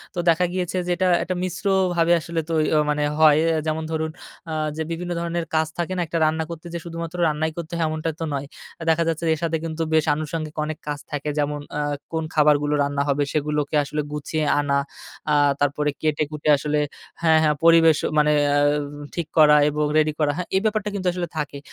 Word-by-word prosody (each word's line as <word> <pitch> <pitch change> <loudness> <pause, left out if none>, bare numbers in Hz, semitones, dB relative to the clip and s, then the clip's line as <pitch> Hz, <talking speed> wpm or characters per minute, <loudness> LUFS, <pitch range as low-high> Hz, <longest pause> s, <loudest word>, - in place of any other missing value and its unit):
তো - - -2
দেখা 170 +2 +3
গিয়েছে 185 0 -2
যে, - - 0
এটা 185 +1 +2 0.2
একটা 185 +1 -3
মিশ্রভাবে 185 -2 +1
তই - - +6
আ - - +1
আসলে 170 0 -3 0.5
মানে 150 0 +1 0.2
হয়। 155 -1 +6 0.3
যেমন 160 0 -1
ধরুন 160 0 -2 0.4
আ - - -3 0.2
যে, - - -2
বিভিন্ন 175 +1 -4
ধরনের 170 0 -2
কাজ 155 0 +2
থাকে 175 +2 -2
না? - - 0
একটা 165 +1 -2
রান্না 160 +1 +1
করতে 165 0 -8
যে 170 - -3
শুধুমাত্র 170 +1 -6
রান্নাই 155 +1 -1
করতে 170 0 -6
হয়, 165 - +1
এমনটা 155 +1 -2
তো 165 - -3
নয়। 140 0 -3 0.3
আ - - -6
দেখা 165 +1 +3
যাচ্ছে 165 0 -1
এর 160 - -4
সাথে 165 -1 0
কিন্তু 165 0 -4
বেশ 155 -1 +3
আনুষঙ্গিক 155 0 -4
অনেক 155 0 -4
কাজ 145 -1 -3
থাকে। 145 0 -3
যেমন, 145 0 -1 0.2
আ - - -1 0.3
কোন 160 0 -1
খাবারগুলো 150 -1 +3
রান্না 140 0 -1
হবে, 145 +1 +2
সেগুলোকে 150 0 -1
আসলে 150 +2 -3
গুছিয়ে 150 +1 -2
আনা। 140 -1 +1 0.5
আহ 145 -1 +4
তারপরে 145 +1 +1
কেটে-কুটে 150 0 -1
আসলে 150 +1 -1 0.4
হ্যাঁ, 160 -1 +5
হ্যাঁ, 150 -1 +3
পরিবেশ 165 -2 +6
অ - - -3
মানে 150 0 +4 0.2
আ - - +3 0.6
ঠিক 170 -3 -2
করা 150 -1 +7
এবং 150 0 -1
রেডি 155 0 +3
করা। 150 -2 +2
হ্যাঁ, 180 - -3
এই 190 - +3
ব্যাপারটা 215 -1 0
কিন্তু 185 -2 -2
আসলে 175 -1 -3
থাকে। 145 -1 -3
155 Hz, 205 wpm, -23 LUFS, 150-170 Hz, 0.6 s, করা